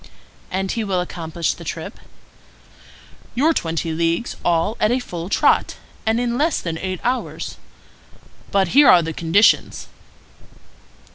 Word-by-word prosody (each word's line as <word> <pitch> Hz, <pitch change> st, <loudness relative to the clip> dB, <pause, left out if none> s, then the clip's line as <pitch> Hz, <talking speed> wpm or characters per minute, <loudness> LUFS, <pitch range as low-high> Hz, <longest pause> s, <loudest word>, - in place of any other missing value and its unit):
"And 190 Hz, +1 st, -2 dB
he 230 Hz, -, -2 dB
will 195 Hz, -3 st, -1 dB
accomplish 170 Hz, -2 st, -3 dB
the -, -, -11 dB
trip?" -, -, -6 dB, 1.4 s
"Your 305 Hz, +7 st, +3 dB
twenty 165 Hz, -, -2 dB
leagues 165 Hz, +7 st, -1 dB
all 175 Hz, +5 st, +1 dB
at 215 Hz, -, +3 dB
a 245 Hz, -, +2 dB
full 175 Hz, -8 st, -6 dB
trot, -, -, +2 dB, 0.3 s
and 225 Hz, +1 st, +2 dB
in 240 Hz, 0 st, -1 dB
less 315 Hz, +1 st, +1 dB
than 165 Hz, -2 st, -4 dB
eight 185 Hz, -1 st, -4 dB
hours. 255 Hz, +1 st, -3 dB, 0.9 s
But 195 Hz, -3 st, +2 dB
here 285 Hz, +5 st, +6 dB
are 175 Hz, -, +7 dB
the 160 Hz, 0 st, -4 dB
conditions." 170 Hz, +7 st, +2 dB
185 Hz, 135 wpm, -20 LUFS, 165-235 Hz, 1.4 s, are